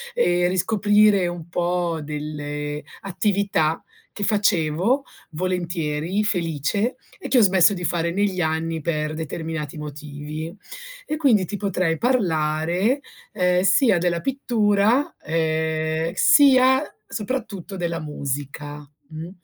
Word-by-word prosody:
e 175 0 +2
riscoprire 205 +1 +3
un 175 -2 -6
po' 175 -1 -1
delle 150 0 -5 0.2
attività 195 -4 0 0.3
che 205 - -6
facevo 200 - +2 0.3
volentieri, 175 +1 -2
felice 180 - -1 0.2
e - - -6
che 260 - +2
ho - - +7
smesso 190 -1 +5
di 180 - -6
fare 170 0 0
negli 190 0 0
anni 160 0 -1
per 155 -1 -2
determinati 160 -1 -5
motivi. 150 +2 -7 0.6
E 305 - -2
quindi 240 - +3
ti 205 - -4
potrei 185 -5 0
parlare, 175 - +1 0.3
ehm, 180 -3 +2
sia 195 +3 +4
della 170 0 0
pittura, 235 - +1
ehm, 160 0 -1
sia, 265 0 +5 0.2
soprattutto, 210 -4 -5
della 170 -1 -2
musica. 145 0 -5 0.2
Mh. 160 +2 -7
175 Hz, 110 wpm, -23 LUFS, 155-205 Hz, 0.6 s, ho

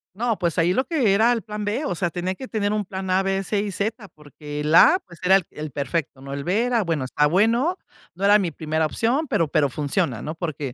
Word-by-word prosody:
No, 230 0 -1
pues, 170 -1 -1
ahí 175 +2 +3
lo 260 - 0
que 260 - +2
era 225 +4 +4
el 230 -2 -1
plan 210 -1 -6
B, 230 +9 -2
o - - -1
sea, 175 0 -1
tenía 180 +2 -3
que 260 +7 -9
tener 210 -2 -1
un 210 -2 -1
plan 190 0 -6
A, 190 +1 +3
B, 195 0 -1
C 205 +2 -1
y 205 -1 -3
Z, 210 +2 -3
porque 150 0 -8
el 150 +2 -1
A, 360 - +7
pues, 170 -3 -15
era 190 +1 +5
el 195 - +3
el 150 -1 -7
perfecto, 140 0 -3
¿no?, 140 0 -7
el 140 0 -4
B, 200 +8 +1
era, 240 -2 +1
bueno, 165 -6 -1
está 150 +3 +2
bueno, 230 - +2 0.4
no 195 +2 -2
era 205 +1 +7
mi 180 -4 -1
primera 155 +1 -1
opción, 260 - 0
pero 165 -8 +1
pero 145 -2 +1
funciona, 135 -4 -1
¿no? 155 - -4
Porque, 150 -6 -5
185 Hz, 255 wpm, -23 LUFS, 155-215 Hz, 0.4 s, A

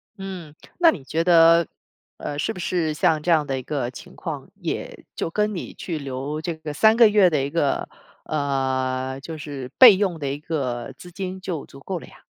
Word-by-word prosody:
嗯， 185 -6 -8 0.2
那 340 -2 +7
你 150 - -8
觉 160 +5 -1
得， 170 -1 +6 0.5
呃， 145 - -5
是 220 - -1
不 185 - -9
是 170 -3 0
像 160 0 +2
这 175 - -3
样 155 -3 +4
的 135 -2 -2
一 - - -6
个 130 -3 -3
情 - - -12
况， - - -6
也 - - -5
就 - - -2
跟 210 +4 0
你 180 - -6
去 165 -4 -4
留 140 +2 -4
这 170 0 -3
个 160 -1 -7
3 220 +8 +5
个 230 -1 +7
月 205 -3 +5
的 150 -5 0
一 140 - -2
个 145 -2 0 0.4
呃， 130 -2 -1
就 160 +3 -7
是 140 -4 -7
备 245 -6 +10
用 190 -3 0
的 145 -3 -4
一 140 +1 -4
个 135 -5 -3
资 180 - -12
金 185 +1 -5
就 175 -6 -5
足 135 - -14
够 185 +4 -4
了 - - -12
呀。 - - -18
160 Hz, 220 characters per minute, -23 LUFS, 140-180 Hz, 0.5 s, 备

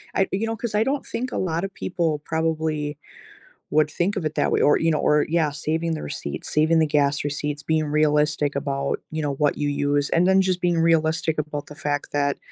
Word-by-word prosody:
I 195 - +2
you 215 +4 -1
know, 225 - -2
'cause 225 -1 -4
I 215 - +4
don't 275 +1 -1
think 255 +1 -4
a - - -2
lotta 175 +1 -1
people 165 -6 -2
probably 160 -2 -1 0.7
would 155 0 +3
think 185 +6 -1
of 180 - -2
it 155 0 -2
that - - +2
way, - - +2
or 145 - +5
you 165 0 +2
know, 155 - +2
or 150 0 +3
yeah, 160 -2 +2
saving 160 +3 -2
the 155 - -5
receipts, 140 - -5
saving 160 +2 +4
the 160 - +4
gas 145 -1 +1
receipts, 145 0 -3
being 160 0 +1
realistic 150 -1 +2
about, 140 -1 -1
you 155 0 -3
know, 145 -1 -1
what 145 +1 +1
you 145 -1 0
use, 145 0 0
and 175 +2 +3
then 190 0 +5
just 185 -1 +1
being 175 -2 +2
realistic 160 -1 +2
about 150 -1 -3
the 150 - -11
fact 145 -1 -2
that 140 -1 0
155 Hz, 220 wpm, -23 LUFS, 145-165 Hz, 0.7 s, or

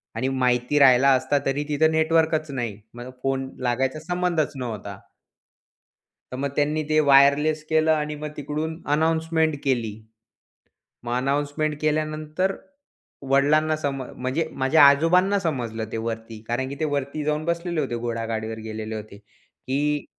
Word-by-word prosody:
आणि 130 - -1
माहिती 125 +1 +1
राहिला 135 -1 +6
असता 145 +3 0
तरी 135 +2 0
तिथं 155 +2 +3
नेटवर्कचं 160 -2 +1
नाही. 115 -5 -4 0.2
मग 120 +1 -8
फोन 135 0 -1
लागायचा 130 +4 0
संबंधच 180 -3 0
नव्हता. 110 -6 -6 1.3
तर - - -5
मग 140 +1 -2
त्यांनी 150 +1 +1
ते 155 0 +3
वायरलेस 140 +3 +5
केलं 160 0 +3
आणि 150 -1 0
मग 150 +1 -6
तिकडून 155 +3 -4
अनाउन्समेंट 160 0 +1
केली. 120 -6 0 1.1
मग 120 0 -5
अनाउन्समेंट 145 +3 -1
केल्यानंतर 155 +4 -1 0.8
वडिलांना 155 +3 +3
सम 140 -3 -3
म्हणजे 130 +5 -3
माझ्या 135 +4 +3
आजोबांना 180 +8 +4
समजलं, 120 -10 -3
ते - - -2
वरती. 115 -1 -5
कारण 125 +3 -1
की 140 - -5
ते - - +1
वरती 145 0 -2
जाऊन 150 +1 -1
बसलेले 170 0 -1
होते, 130 -5 -2
घोडागाडीवर 115 -1 -3
गेलेले 110 0 -5
होते. 105 -1 -9
की 140 +7 -4
145 Hz, 135 wpm, -24 LUFS, 125-155 Hz, 1.3 s, राहिला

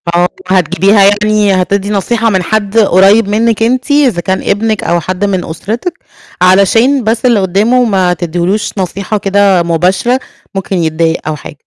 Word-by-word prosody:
آه، 175 +1 +3 0.2
هتجيبيها 190 +3 +2
يعني 205 0 +2
هتدّي 200 +2 -2
نصيحة 225 +3 0
من 190 -3 0
حد 215 +2 -2
قُريِّب 200 +1 +4
منِّك 225 +1 0
أنتِ 255 +4 -1
إذا 260 -12 +2
كان 190 +1 -2
ابنِك 215 +1 -1
أو 170 0 0
حد 185 +4 -3
من 190 -3 -2
أسرتِك، 220 - -5 0.5
علشان 225 +8 +3
بس 225 +3 -1
اللي 235 -4 +3
قدامه 210 +7 +1
ما 190 -5 +1
تدّيلوش 175 +4 -2
نصيحة 195 +3 -3
كده 195 -2 +2
مباشرة 185 +9 0 0.4
ممكن 195 0 -3
يتضايق 165 0 -1
أو 155 - -2
حاجة. 150 - -11
200 Hz, 155 wpm, -11 LUFS, 180-220 Hz, 0.5 s, قُريِّب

